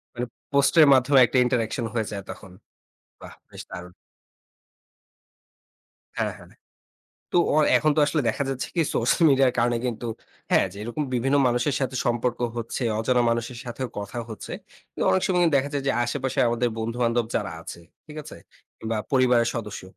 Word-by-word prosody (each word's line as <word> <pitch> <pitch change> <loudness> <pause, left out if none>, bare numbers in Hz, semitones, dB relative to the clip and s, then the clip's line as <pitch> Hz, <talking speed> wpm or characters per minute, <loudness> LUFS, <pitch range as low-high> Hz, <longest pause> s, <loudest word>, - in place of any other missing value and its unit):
মানে 120 +1 -2 0.3
পোস্টের 140 +3 +5
মাধ্যমে 130 +1 +4
একটা 125 +2 -1
interaction 120 -1 -1
হয়ে 110 -3 -1
যায় 100 -2 -5
তখন। 95 -3 -9 0.7
বাহ্! - - -11
বেশ - - -9
দারুণ! 90 0 -9 2.3
হ্যাঁ, - - -1
হ্যাঁ। - - -16 0.8
তো - - +1 0.2
অ - - +3 0.2
এখন 155 - +2
তো - - +4
আসলে 150 0 0
দেখা 125 - -1
যাচ্ছে 135 -1 -3
কী, 170 - +1
সোশ্যাল 120 +8 +1
মিডিয়ার 135 -2 +4
কারণে 120 0 +2
কিন্তু 120 0 -4 0.4
হ্যাঁ, - - +4
যেইরকম 120 +8 -4
বিভিন্ন 135 +4 +1
মানুষের 120 +3 +1
সাথে 130 0 -2
সম্পর্ক 120 +1 0 0.2
হচ্ছে, 115 +2 -4 0.2
অজানা 120 +2 +2
মানুষের 115 +1 -3
সাথেও 125 +1 -5
কথা 100 +4 -6
হচ্ছে। 110 - -8 0.4
কিন্তু - - -4
অনেক 185 - +2
সময় 185 -2 +1
কিন্তু 165 - +4
দেখা 140 +1 0
যায় 140 - -1
যে - - +3
আশেপাশে 135 +1 -3
আমাদের 120 +1 0
বন্ধু-বান্ধব 115 +1 0
যারা - - -1
আছে, 85 - -9 0.3
ঠিক 150 0 -11
আছে? - - -11 0.4
কিংবা 110 0 -3 0.2
পরিবারের 125 -3 +3
সদস্য, 105 -5 -5
120 Hz, 160 wpm, -24 LUFS, 115-135 Hz, 2.3 s, পোস্টের